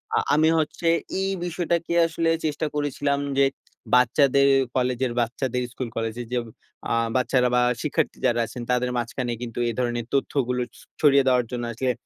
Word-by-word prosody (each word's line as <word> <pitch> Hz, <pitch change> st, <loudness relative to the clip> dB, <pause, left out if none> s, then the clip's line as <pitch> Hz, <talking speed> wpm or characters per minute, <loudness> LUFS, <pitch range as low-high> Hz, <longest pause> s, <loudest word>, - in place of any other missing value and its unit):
আ -, -, +3 dB, 0.2 s
আমি 155 Hz, +2 st, +4 dB
হচ্ছে 160 Hz, +2 st, -2 dB, 0.3 s
এই 195 Hz, 0 st, 0 dB
বিষয়টাকে 170 Hz, -1 st, -1 dB
আসলে 165 Hz, 0 st, -1 dB, 0.2 s
চেষ্টা 155 Hz, +1 st, -1 dB
করেছিলাম, 145 Hz, -1 st, 0 dB, 0.2 s
যে 140 Hz, -, +6 dB, 0.5 s
বাচ্চাদের 140 Hz, +2 st, +4 dB, 0.3 s
কলেজের, 125 Hz, 0 st, 0 dB
বাচ্চাদের 125 Hz, +1 st, -2 dB
স্কুল, 125 Hz, -2 st, -5 dB
কলেজের 115 Hz, +1 st, -3 dB
যে -, -, +1 dB, 0.5 s
আ -, -, +1 dB, 0.2 s
বাচ্চারা 125 Hz, -1 st, +2 dB
বা 125 Hz, -, +4 dB, 0.2 s
শিক্ষার্থী 150 Hz, -, -1 dB
যারা 120 Hz, -2 st, +2 dB
আছেন, 120 Hz, +2 st, -8 dB
তাদের 125 Hz, 0 st, +1 dB
মাঝখানে 120 Hz, +1 st, -2 dB
কিন্তু 120 Hz, -1 st, -5 dB
এ -, -, 0 dB
ধরনের 120 Hz, -2 st, -1 dB
তথ্যগুলো 125 Hz, -2 st, 0 dB, 0.2 s
স -, -, -15 dB, 0.2 s
ছড়িয়ে 140 Hz, -2 st, +5 dB
দেওয়ার 125 Hz, -2 st, +3 dB
জন্য 120 Hz, -1 st, -3 dB
আসলে 125 Hz, +2 st, 0 dB
130 Hz, 160 wpm, -24 LUFS, 125-145 Hz, 0.5 s, যে